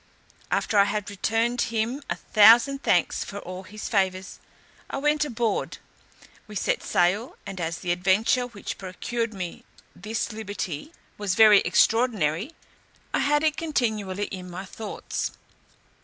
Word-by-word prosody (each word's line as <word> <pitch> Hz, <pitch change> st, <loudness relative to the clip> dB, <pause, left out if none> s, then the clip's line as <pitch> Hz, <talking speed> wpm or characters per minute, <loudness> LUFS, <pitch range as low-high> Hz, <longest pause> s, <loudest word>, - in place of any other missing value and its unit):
After 210 Hz, -, +1 dB
I 200 Hz, -, +7 dB
had 210 Hz, -1 st, -3 dB
returned 225 Hz, +4 st, 0 dB
him 230 Hz, +5 st, -1 dB
a -, -, 0 dB
thousand 235 Hz, +6 st, +5 dB
thanks -, -, +2 dB
for 200 Hz, -, -8 dB
all 185 Hz, -1 st, -7 dB
his 210 Hz, +3 st, -8 dB
favours, 190 Hz, -3 st, -1 dB, 0.5 s
I -, -, -3 dB
went 295 Hz, +2 st, +2 dB
aboard. 235 Hz, -5 st, -2 dB, 0.7 s
We 210 Hz, -, -10 dB
set 190 Hz, -, 0 dB
sail, 195 Hz, +8 st, +1 dB
and 190 Hz, -2 st, -6 dB
as 165 Hz, +1 st, -2 dB
the 180 Hz, -, -2 dB
adventure 195 Hz, +7 st, +2 dB
which 230 Hz, -5 st, -7 dB
procured 230 Hz, +5 st, -3 dB
me 180 Hz, -3 st, -6 dB, 0.3 s
this 220 Hz, +5 st, -3 dB
liberty 205 Hz, -, -5 dB, 0.3 s
was 200 Hz, -3 st, -1 dB
very 215 Hz, -2 st, +8 dB
extraordinary, 225 Hz, -, +2 dB, 0.6 s
I -, -, +2 dB
had 295 Hz, +1 st, +2 dB
it 310 Hz, -1 st, +1 dB
continually 215 Hz, -, -1 dB
in 185 Hz, -2 st, -7 dB
my 180 Hz, +2 st, -7 dB
thoughts. 215 Hz, +3 st, -5 dB
210 Hz, 140 wpm, -25 LUFS, 190-235 Hz, 0.7 s, very